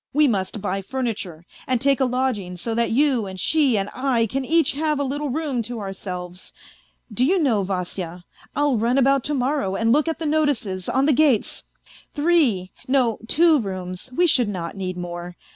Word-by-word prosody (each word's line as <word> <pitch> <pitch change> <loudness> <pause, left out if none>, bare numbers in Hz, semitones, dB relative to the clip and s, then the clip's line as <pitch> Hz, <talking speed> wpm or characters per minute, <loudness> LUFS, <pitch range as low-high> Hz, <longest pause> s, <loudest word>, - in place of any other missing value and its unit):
We 300 +1 +4
must 200 -3 -2
buy 195 -1 -2
furniture, 200 -8 -4 0.2
and 255 -2 +1
take 275 +1 +2
a 265 - +3
lodging 250 -8 -1
so 225 +6 -3
that 235 +1 +1
you 255 -4 +2
and 190 0 -7
she 280 - +3
and 195 0 -1
I 255 -3 +1
can 265 +5 -3
each 325 +4 +3
have 300 0 -1
a - - +1
little 285 +2 -3
room 280 -3 -2
to 235 +1 -5
ourselves. 180 -2 -7 0.6
Do 240 - +1
you 360 +9 +3
know, 260 - +2
Vasya, 180 -2 -4 0.3
I'll 290 -4 +2
run 235 +4 +1
about 275 0 +3
to 295 - 0
morrow 255 -7 -1
and 225 +2 +1
look 300 +3 +2
at 325 - -1
the 325 - -4
notices, 285 -12 0
on 265 +1 +2
the 300 - +4
gates! 270 -5 +2 0.5
Three... 290 - +2 0.2
no, 255 -4 +2
two 320 +3 +4
rooms, 185 -2 -6
we 350 +8 +2
should 250 -9 +4
not 170 -4 -5
need 185 -2 -4
more. 175 0 -6
245 Hz, 190 wpm, -22 LUFS, 190-285 Hz, 0.6 s, We